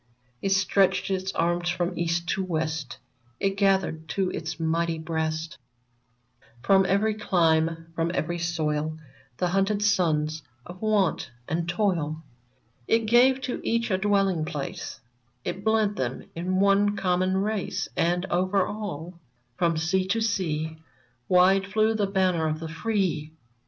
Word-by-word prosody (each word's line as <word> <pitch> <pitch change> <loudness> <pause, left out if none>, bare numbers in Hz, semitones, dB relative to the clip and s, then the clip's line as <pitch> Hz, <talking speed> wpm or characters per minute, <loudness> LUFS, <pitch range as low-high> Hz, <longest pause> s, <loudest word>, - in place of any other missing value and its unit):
It 195 - 0
stretched 195 0 +2
its 190 0 -1
arms 175 +1 0
from 175 0 -1
East 170 0 -1
to 190 - 0
West; 160 -6 -3 0.4
It 195 0 0
gathered 190 -5 +1
to 190 +1 0
its 160 +1 -5
mighty 165 +1 0
breast 160 0 -3
I20 120 0 -43
VERMONT 120 0 -22
From 195 -1 +5
every 215 +2 +2
clime, 165 -5 +1
from 165 0 -1
every 175 +2 -1
soil, 155 -2 -1 0.4
The 180 - 0
hunted 195 +3 +1
sons 155 -6 +1 0.2
of 180 +2 -11
want 210 -5 +1 0.2
and 170 +2 -2
toil; 165 -6 0 0.6
It 225 0 +2
gave 250 +4 +5
to 255 -1 -3
each 230 -1 0
a 185 - +2
dwelling 195 -4 +2
place; 160 +3 -5 0.4
It 195 - -4
blent 220 -1 +2
them 125 0 -3
in 185 +3 -1
one 200 +1 +3
common 185 0 +1
race; 205 0 -1
And 175 +2 +1
over 185 +2 +2
all, 180 -5 -6 0.4
from 170 -3 +1
sea 185 +4 +1
to 225 +4 +1
sea, 160 -8 -1 0.5
Wide 190 +2 +5
flew 215 +2 +2
the 210 -2 0
banner 185 -4 +1
of 155 0 -2
the 165 0 -6
free 170 -4 -1
180 Hz, 145 wpm, -26 LUFS, 160-195 Hz, 0.6 s, From